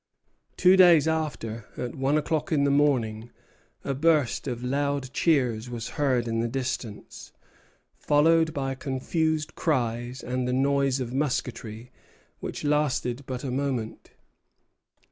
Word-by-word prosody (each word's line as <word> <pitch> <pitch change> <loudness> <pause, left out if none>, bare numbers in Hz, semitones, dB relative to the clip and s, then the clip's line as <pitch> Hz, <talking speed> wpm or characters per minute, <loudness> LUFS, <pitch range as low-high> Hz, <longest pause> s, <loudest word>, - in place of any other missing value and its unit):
Two 185 +1 +6
days 175 -5 +6
after, 120 -9 -3
at 125 - -4
one 135 +2 +1
o'clock 155 +1 -1
in 145 -3 +2
the 140 - +3
morning, 120 -6 +1 0.5
a 140 - -2
burst 145 -2 +1
of 120 -2 -4
loud 140 0 -1
cheers 125 -9 +1
was 115 -2 -5
heard 130 -5 0
in 115 0 -1
the 115 - 0
distance, 125 -4 -5 0.7
followed 160 +2 +3
by 135 -2 -2
confused 155 +4 -1
cries 120 -4 -1
and 125 0 -2
the 125 - 0
noise 135 0 +2
of 125 -1 -4
musketry, 125 -4 -3 0.5
which - - -6
lasted 145 -3 0
but 125 -1 -5
a 135 - -3
moment. 130 -4 -3
135 Hz, 130 wpm, -26 LUFS, 125-150 Hz, 0.7 s, Two